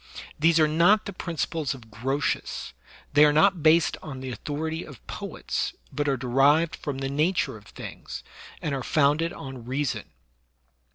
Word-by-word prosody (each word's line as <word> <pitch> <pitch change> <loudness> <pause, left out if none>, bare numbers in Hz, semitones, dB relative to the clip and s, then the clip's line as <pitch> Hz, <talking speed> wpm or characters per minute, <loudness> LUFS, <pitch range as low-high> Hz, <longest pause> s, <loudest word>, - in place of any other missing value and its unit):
These 165 +2 +5
are 155 - +5
not 175 +8 +4
the 200 - -5
principles 165 -5 -2
of 115 -4 -15
Grotius;* 130 - -2 0.4
they 145 +1 +7
are 150 - +7
not 180 +3 +4
based 155 +1 +4
on 135 -4 -7
the 130 0 -5
authority 160 +5 -3
of 140 -6 -13
poets, - - -4 0.2
but 145 0 -1
are 135 - +1
derived 140 +6 +3
from 145 -2 -4
the 135 0 -2
nature 155 +2 +1
of 105 -1 -13
things, - - -8 0.4
and 150 - -1
are 135 - -2
founded 150 +4 +2
on 130 -3 -8
reason. 130 +2 -2
145 Hz, 160 wpm, -26 LUFS, 135-160 Hz, 0.4 s, they